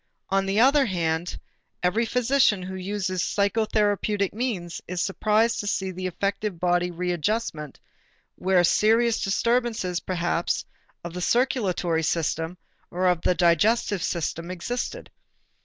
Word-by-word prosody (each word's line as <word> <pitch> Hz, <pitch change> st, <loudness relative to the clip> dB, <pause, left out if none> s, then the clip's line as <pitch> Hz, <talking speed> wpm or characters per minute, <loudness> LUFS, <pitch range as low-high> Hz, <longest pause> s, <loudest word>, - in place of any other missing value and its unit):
On 195 Hz, 0 st, +1 dB
the 195 Hz, +2 st, +1 dB
other 270 Hz, +2 st, +5 dB
hand, 170 Hz, -2 st, -2 dB, 0.4 s
every 220 Hz, +6 st, +1 dB
physician 250 Hz, -5 st, +2 dB
who 185 Hz, +1 st, -6 dB
uses 190 Hz, -1 st, -2 dB
psychotherapeutic 205 Hz, -1 st, 0 dB
means 205 Hz, -8 st, -3 dB
is 180 Hz, 0 st, -4 dB
surprised 215 Hz, +5 st, +1 dB
to 205 Hz, -, -3 dB
see 190 Hz, -1 st, -1 dB
the 185 Hz, 0 st, -4 dB
effective 200 Hz, 0 st, -2 dB
bodily 175 Hz, 0 st, +1 dB
readjustment 175 Hz, -, -2 dB, 0.5 s
where 185 Hz, -1 st, +2 dB
serious 225 Hz, +5 st, +3 dB
disturbances 220 Hz, -3 st, 0 dB
perhaps 175 Hz, -2 st, -1 dB, 0.4 s
of 170 Hz, -1 st, -7 dB
the 180 Hz, -, -5 dB
circulatory 190 Hz, -8 st, +1 dB
system 165 Hz, +2 st, -1 dB, 0.3 s
or 180 Hz, 0 st, +2 dB
the 175 Hz, +1 st, 0 dB
digestive 190 Hz, +4 st, +2 dB
system 170 Hz, 0 st, -3 dB
existed. 215 Hz, +8 st, -4 dB
190 Hz, 120 wpm, -25 LUFS, 175-220 Hz, 0.5 s, other